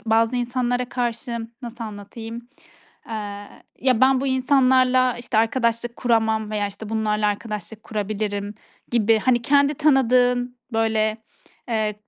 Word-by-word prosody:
bazı 225 Hz, +2 st, +3 dB
insanlara 245 Hz, 0 st, -1 dB
karşı 235 Hz, -1 st, -3 dB
nasıl 235 Hz, -1 st, -6 dB
anlatayım, 225 Hz, +3 st, -8 dB, 0.6 s
eee, 205 Hz, -2 st, -6 dB, 0.3 s
"Ya, 255 Hz, -2 st, +2 dB
ben 260 Hz, 0 st, +5 dB
bu 275 Hz, -, -2 dB
insanlarla 255 Hz, -1 st, +3 dB
işte, 240 Hz, -2 st, -4 dB
eee, 220 Hz, -, +6 dB
arkadaşlık 235 Hz, -1 st, -1 dB
kuramam 220 Hz, -3 st, +1 dB
veya 210 Hz, -1 st, -1 dB
işte 205 Hz, +2 st, -9 dB
bunlarla 215 Hz, -1 st, 0 dB
arkadaşlık 210 Hz, +1 st, -4 dB
kurabilirim." 205 Hz, -1 st, -3 dB, 0.4 s
gibi, 225 Hz, -2 st, +3 dB
hani, 240 Hz, 0 st, +2 dB
kendi 285 Hz, +2 st, +3 dB
tanıdığın 250 Hz, -3 st, +2 dB
böyle, 220 Hz, -1 st, +1 dB, 0.5 s
eee, 215 Hz, -2 st, 0 dB
230 Hz, 125 wpm, -23 LUFS, 215-250 Hz, 0.6 s, eee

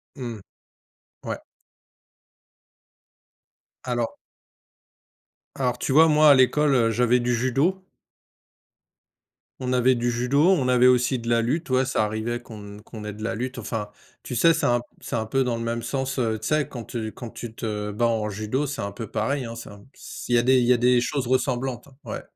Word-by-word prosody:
Mmh. 120 Hz, -5 st, -6 dB, 0.9 s
Ouais. -, -, -4 dB, 2.4 s
Alors 120 Hz, -2 st, -2 dB, 1.4 s
alors, 125 Hz, -2 st, -1 dB
tu -, -, -2 dB
vois, 160 Hz, +2 st, +7 dB
moi 150 Hz, 0 st, +6 dB
à 140 Hz, -, +8 dB
l'école, 140 Hz, +3 st, +3 dB
heu, 115 Hz, -2 st, +3 dB
j'avais 125 Hz, +1 st, +3 dB
du 120 Hz, 0 st, 0 dB
judo. 135 Hz, +11 st, +1 dB, 1.8 s
On 130 Hz, -1 st, -2 dB
avait 125 Hz, +1 st, +3 dB
du 120 Hz, 0 st, 0 dB
judo, 135 Hz, +8 st, +2 dB
on 135 Hz, -9 st, +2 dB
avait 125 Hz, 0 st, +4 dB
aussi 125 Hz, +1 st, +4 dB
de 115 Hz, 0 st, -8 dB
la 115 Hz, 0 st, +3 dB
lutte, 145 Hz, +5 st, -2 dB
ouais, 130 Hz, +1 st, +3 dB
ça 125 Hz, -4 st, 0 dB
arrivait 110 Hz, +3 st, -3 dB
qu'on 105 Hz, -3 st, -10 dB
qu'on 110 Hz, -2 st, -10 dB
ait 105 Hz, -, -5 dB
de 110 Hz, +1 st, -9 dB
la 115 Hz, 0 st, -1 dB
lutte. 125 Hz, +3 st, -4 dB
Enfin, 110 Hz, -2 st, -4 dB, 0.3 s
tu 125 Hz, -, -6 dB
sais, 165 Hz, +8 st, +5 dB
c'est -, -, 0 dB
un 120 Hz, 0 st, +2 dB
p -, -, -17 dB, 0.2 s
c'est -, -, -5 dB
un 110 Hz, -1 st, -1 dB
peu 135 Hz, +4 st, +1 dB
dans 120 Hz, -2 st, -1 dB
le 115 Hz, -, -4 dB
même 115 Hz, 0 st, -2 dB
sens, 135 Hz, +2 st, -3 dB
heu, 110 Hz, -2 st, 0 dB
tu 110 Hz, -, -5 dB
sais 155 Hz, -1 st, +1 dB
quand 120 Hz, -3 st, -7 dB
tu 110 Hz, -2 st, -5 dB
quand 120 Hz, -3 st, -9 dB
tu 115 Hz, -2 st, -8 dB
te 105 Hz, -2 st, -4 dB
bats 120 Hz, +3 st, 0 dB
en 110 Hz, -2 st, 0 dB
judo, 110 Hz, +8 st, -2 dB
c'est 140 Hz, -5 st, -4 dB
un 100 Hz, -, -4 dB
peu 110 Hz, +2 st, -7 dB
pareil, 140 Hz, -2 st, -1 dB
hein, 115 Hz, 0 st, -7 dB
c'est 115 Hz, -, -9 dB
un 100 Hz, -, -13 dB
p -, -, -18 dB, 0.4 s
il 120 Hz, -, +3 dB
y -, -, +6 dB
a 120 Hz, -, +3 dB
des 130 Hz, 0 st, +4 dB
il 120 Hz, -, +2 dB
y 125 Hz, -, +6 dB
a -, -, +2 dB
des 125 Hz, 0 st, +3 dB
choses 135 Hz, 0 st, -2 dB
ressemblantes, 130 Hz, 0 st, -1 dB, 0.2 s
ouais. -, -, -6 dB
120 Hz, 200 wpm, -24 LUFS, 115-130 Hz, 2.4 s, à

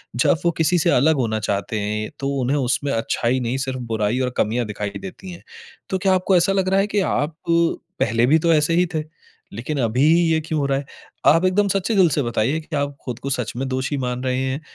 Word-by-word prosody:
जब 125 Hz, +6 st, +3 dB
वो 170 Hz, -, +4 dB
किसी 175 Hz, +2 st, +3 dB
से -, -, +2 dB
अलग 155 Hz, +6 st, +4 dB
होना 115 Hz, -5 st, -1 dB
चाहते 100 Hz, +1 st, -2 dB
हैं, 105 Hz, +1 st, -3 dB
तो 140 Hz, 0 st, -2 dB
उन्हें 135 Hz, +4 st, +1 dB
उसमें 140 Hz, +1 st, 0 dB
अच्छाई 115 Hz, +2 st, 0 dB
नहीं, 125 Hz, +1 st, -2 dB
सिर्फ 130 Hz, -1 st, -3 dB
बुराई 110 Hz, +3 st, 0 dB
और 130 Hz, -1 st, 0 dB
कमियाँ 115 Hz, +3 st, 0 dB
दिखाई 105 Hz, -1 st, -4 dB
देती 190 Hz, -1 st, -9 dB
हैं। 175 Hz, -, -11 dB, 0.5 s
तो 190 Hz, -, 0 dB
क्या 190 Hz, 0 st, +2 dB
आपको 185 Hz, 0 st, +2 dB
ऐसा 175 Hz, +3 st, +3 dB
लग 190 Hz, -1 st, +1 dB
रहा 195 Hz, +1 st, +3 dB
है 200 Hz, -, +1 dB
कि 205 Hz, 0 st, 0 dB, 0.2 s
आप 150 Hz, +4 st, -1 dB
पहले 165 Hz, -, +1 dB
भी 155 Hz, +4 st, +4 dB
तो 165 Hz, +1 st, +3 dB
ऐसे 150 Hz, +2 st, +2 dB
ही 180 Hz, +1 st, +3 dB
थे, 155 Hz, -, -1 dB, 0.5 s
लेकिन 125 Hz, +8 st, -4 dB
अभी 120 Hz, +4 st, +1 dB, 0.3 s
ये 160 Hz, -, +3 dB
क्यों 155 Hz, -3 st, -1 dB
हो 140 Hz, -, 0 dB
रहा 135 Hz, -, +1 dB
है? 140 Hz, -, -8 dB, 0.4 s
आप 165 Hz, +4 st, +5 dB
एकदम 200 Hz, +2 st, +2 dB
सच्चे 195 Hz, +3 st, 0 dB
दिल 185 Hz, -4 st, +5 dB
से 145 Hz, -, 0 dB
बताइए 120 Hz, +6 st, 0 dB
कि 155 Hz, 0 st, -7 dB
आप 140 Hz, 0 st, -2 dB
खुद 125 Hz, -2 st, -5 dB
को 140 Hz, -, -5 dB
सच 125 Hz, -3 st, -2 dB
में 135 Hz, +1 st, -2 dB
दोषी 130 Hz, +2 st, -2 dB
मान 125 Hz, 0 st, -3 dB
रहे 130 Hz, 0 st, 0 dB
हैं 130 Hz, +3 st, -2 dB
140 Hz, 235 wpm, -21 LUFS, 120-170 Hz, 0.5 s, आप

